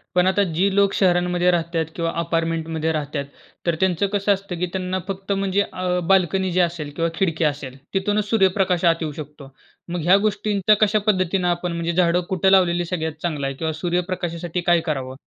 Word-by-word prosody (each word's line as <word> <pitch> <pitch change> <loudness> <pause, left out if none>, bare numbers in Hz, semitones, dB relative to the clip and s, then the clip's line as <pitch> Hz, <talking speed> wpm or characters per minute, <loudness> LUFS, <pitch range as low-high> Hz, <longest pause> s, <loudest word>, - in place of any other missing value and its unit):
पण 180 0 +4
आता 190 +2 +3
जी 190 +4 +1
लोक 200 -1 +3
शहरांमध्ये 180 -1 +2
राहत 170 -1 -2
आहेत 165 -1 +1
किंवा 165 -1 -1
अपार्टमेंटमध्ये 165 -1 -1
राहतात, 150 -2 -3 0.4
तर 170 -1 +1
त्यांचं 190 0 +1
कसं 205 0 +2
असतं 195 -2 -6
की 180 - +1
त्यांना 185 0 -2
फक्त 195 0 -5
म्हणजे 195 0 +1
अ, 180 -1 -1
बाल्कनी 190 0 +2
जी 180 - +1
असेल, 170 -4 0
किंवा 165 0 0
खिडकी 165 -3 0
असेल 140 -3 -3 0.2
तिथूनच 205 +2 0
सूर्यप्रकाश 190 -4 +2
आत 165 -1 +5
येऊ 155 -2 -2
शकतो. 150 -2 -10 0.4
मग 175 - -2
ह्या 180 +4 +6
गोष्टींचा 210 -1 +1
कशा 215 0 +4
पद्धतीनं 185 -2 +1
आपण 175 0 -1
म्हणजे 170 0 -2
झाडं 175 0 +2
कुठं 190 0 +2
लावलेली 175 -2 +3
सगळ्यात 160 -3 -3
चांगलं 155 -5 -2
आहे? 135 - -4
किंवा 160 +2 -2
सूर्यप्रकाशासाठी 175 0 -2
काय 175 0 +3
करावं? 135 -5 -4
175 Hz, 185 wpm, -22 LUFS, 165-190 Hz, 0.4 s, ह्या